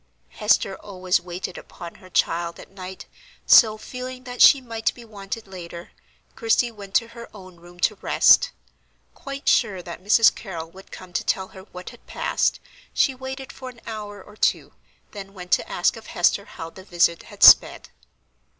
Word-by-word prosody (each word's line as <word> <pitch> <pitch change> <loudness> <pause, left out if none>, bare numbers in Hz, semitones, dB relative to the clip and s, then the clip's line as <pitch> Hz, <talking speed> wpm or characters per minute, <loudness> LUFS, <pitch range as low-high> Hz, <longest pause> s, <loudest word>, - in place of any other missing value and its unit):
Hester 210 -2 +1
always 185 -3 -1
waited 180 +1 -6
upon 170 -1 -11
her 185 - -15
child 170 0 -1
at - - -13
night; 190 -1 -9 0.4
so, 215 -2 +6
feeling 255 +3 -8
that 245 0 -6
she 280 - +8
might 230 -3 -2
be 240 - -13
wanted 210 0 -7
later, 175 -3 -10 0.4
Christie 230 +1 +1
went 200 -3 -11
to 230 - +2
her 235 0 -11
own 185 -3 -13
room 175 +1 -17
to 215 - +3
rest. - - +4 0.6
Quite 275 0 -9
sure 190 -3 +2
that 175 +1 -9
Mrs. 220 +3 +5
Carrol 165 -5 -8
would 190 +2 -16
come 185 -1 -11
to - - -1
tell 190 -1 -1
her 190 0 -13
what 180 0 -9
had - - -19
passed, - - -1 0.4
she 270 - +3
waited 265 0 -8
for 260 -1 -9
an 240 -2 -15
hour 205 -3 -7
or 210 - -16
two, - - 0 0.4
then 195 -1 -10
went 180 -1 -10
to - - +2
ask 175 - +1
of 225 - -12
Hester 190 +3 +1
how 165 0 -9
the 190 - -13
visit 170 -2 +1
had - - -4
sped. - - +7
195 Hz, 175 wpm, -23 LUFS, 180-230 Hz, 0.6 s, she